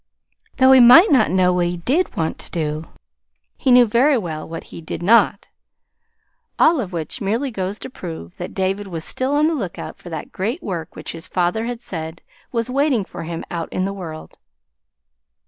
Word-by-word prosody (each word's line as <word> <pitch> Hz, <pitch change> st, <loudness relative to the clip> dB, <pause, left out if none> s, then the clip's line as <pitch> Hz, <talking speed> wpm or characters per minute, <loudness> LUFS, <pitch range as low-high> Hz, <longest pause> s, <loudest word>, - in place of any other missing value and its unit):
Though 260 Hz, 0 st, +6 dB
he 265 Hz, -, +8 dB
might 285 Hz, -, +8 dB
not 255 Hz, -6 st, +4 dB
know 180 Hz, -1 st, +3 dB
what 175 Hz, -1 st, +1 dB
he 175 Hz, 0 st, -3 dB
did 270 Hz, -, 0 dB
want 160 Hz, -2 st, -2 dB
to -, -, -7 dB
do, 155 Hz, -1 st, -3 dB, 0.7 s
he 270 Hz, -, -1 dB
knew 250 Hz, -1 st, +7 dB
very 250 Hz, +6 st, +3 dB
well 160 Hz, -8 st, -5 dB
what 165 Hz, 0 st, -6 dB
he -, -, -8 dB
did 160 Hz, +1 st, -6 dB
not. 210 Hz, 0 st, +3 dB, 1.1 s
All 320 Hz, -2 st, +4 dB
of 195 Hz, -5 st, -6 dB
which 165 Hz, -4 st, -5 dB
merely 230 Hz, +7 st, -1 dB
goes 195 Hz, -1 st, -3 dB
to -, -, -7 dB
prove 160 Hz, -, -8 dB
that -, -, -7 dB
David 195 Hz, +1 st, -1 dB
was 165 Hz, -3 st, -4 dB
still 265 Hz, +2 st, -1 dB
on 300 Hz, +1 st, +3 dB
the 325 Hz, -, +2 dB
lookout 195 Hz, -, -5 dB
for 175 Hz, -, -11 dB
that 160 Hz, -, -6 dB
great 225 Hz, -, -3 dB
work 170 Hz, -5 st, -5 dB
which -, -, -6 dB
his 165 Hz, -1 st, -7 dB
father 185 Hz, +5 st, 0 dB
had 240 Hz, -1 st, -5 dB
said 160 Hz, -1 st, -6 dB, 0.3 s
was 230 Hz, -1 st, -1 dB
waiting 260 Hz, -5 st, +1 dB
for -, -, -8 dB
him 165 Hz, 0 st, -5 dB
out 170 Hz, -1 st, -4 dB
in 185 Hz, -, -1 dB
the 195 Hz, -, -3 dB
world. 165 Hz, -5 st, -9 dB
195 Hz, 195 wpm, -20 LUFS, 170-245 Hz, 1.1 s, he